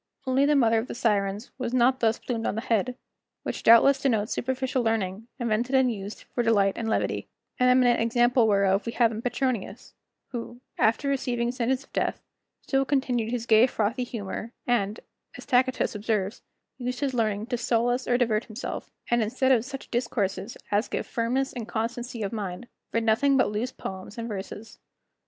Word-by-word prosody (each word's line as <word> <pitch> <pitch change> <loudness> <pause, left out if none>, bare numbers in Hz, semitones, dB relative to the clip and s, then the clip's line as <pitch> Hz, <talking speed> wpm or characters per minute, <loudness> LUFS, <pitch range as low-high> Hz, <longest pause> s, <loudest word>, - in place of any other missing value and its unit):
Only 265 +2 +3
the 295 - +4
mother 230 -4 +4
of 225 - -4
the - - -6
Sirens 205 -2 0
was 250 -1 -2
not 255 +1 +4
thus 225 -1 +2
plumed 230 -3 -3
on - - -1
the 225 - -2
head, 245 +1 0 0.5
which - - -4
doubtless 270 +4 +6
denotes 225 -6 +1
superficial 260 0 -1
learning, 225 -2 -1
invented 240 +1 0
and 260 -2 +4
used 200 0 -7
for 245 - +1
delight 205 -4 +3
and 225 -1 -3
levity; - - -1 0.3
an 250 0 +5
eminent 250 -2 +4
example 240 +1 +3
whereof 200 0 +2
we 230 - -2
have 235 -2 +3
in 220 0 -5
Petronius, 245 -3 -2 0.4
who, 240 -1 -6 0.2
after 230 +6 +2
receiving 245 -3 0
sentence 255 +1 -1
of - - -26
death, - - -1 0.4
still 270 -1 +1
continued 260 -5 0
his 235 -1 -2
gay 225 +2 +6
frothy 230 +1 -1
humor, 225 0 -5
and 215 -3 0 0.4
as - - -10
Tacitus 255 -1 +2
observes, 210 -2 -2 0.4
used 250 +1 -3
his 275 -2 0
learning 215 -3 0
to 245 0 -2
solace 245 +2 +1
or 245 - +3
divert 225 -3 +1
himself, 220 +1 -6 0.2
and 240 0 +4
instead 255 +5 +1
of 235 -4 +4
such 270 +1 -8
discourses 215 -4 -2
as 205 +3 +2
give - - -3
firmness 255 +4 -1
and 235 -4 -5
constancy 235 +1 -3
of 200 - -3
mind, 205 +1 -5 0.2
read 230 - 0
nothing 270 +5 +3
but 255 - +3
loose 220 +4 -2
poems 190 +3 -8
and 230 0 -4
verses. 210 +1 -7
235 Hz, 180 wpm, -26 LUFS, 220-255 Hz, 0.5 s, doubtless